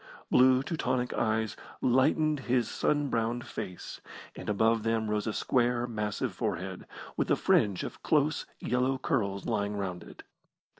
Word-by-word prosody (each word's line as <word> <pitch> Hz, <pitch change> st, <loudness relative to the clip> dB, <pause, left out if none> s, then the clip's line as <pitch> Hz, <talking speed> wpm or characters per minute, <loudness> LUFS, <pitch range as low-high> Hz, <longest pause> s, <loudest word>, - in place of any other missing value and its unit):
Blue 130 Hz, +1 st, +5 dB
Teutonic 130 Hz, -5 st, -1 dB
eyes 110 Hz, -1 st, 0 dB, 0.2 s
lightened 145 Hz, +4 st, +3 dB
his 120 Hz, -2 st, +3 dB
sun 145 Hz, -1 st, 0 dB
browned 115 Hz, +1 st, -1 dB
face, 90 Hz, -, -7 dB, 0.3 s
and -, -, -6 dB
above 110 Hz, +2 st, +3 dB
them 110 Hz, -1 st, 0 dB
rose 105 Hz, 0 st, -1 dB
a -, -, +1 dB
square, 120 Hz, 0 st, +1 dB
massive 105 Hz, -3 st, -2 dB
forehead, 95 Hz, +2 st, -4 dB, 0.3 s
with -, -, -1 dB
a -, -, +5 dB
fringe 100 Hz, -3 st, +2 dB
of -, -, -7 dB
close 150 Hz, 0 st, +1 dB
yellow 125 Hz, +2 st, +1 dB
curls 105 Hz, -, -1 dB
lying 105 Hz, -2 st, -1 dB
round 90 Hz, -3 st, -3 dB
it. -, -, -12 dB
115 Hz, 145 wpm, -30 LUFS, 105-130 Hz, 0.3 s, Blue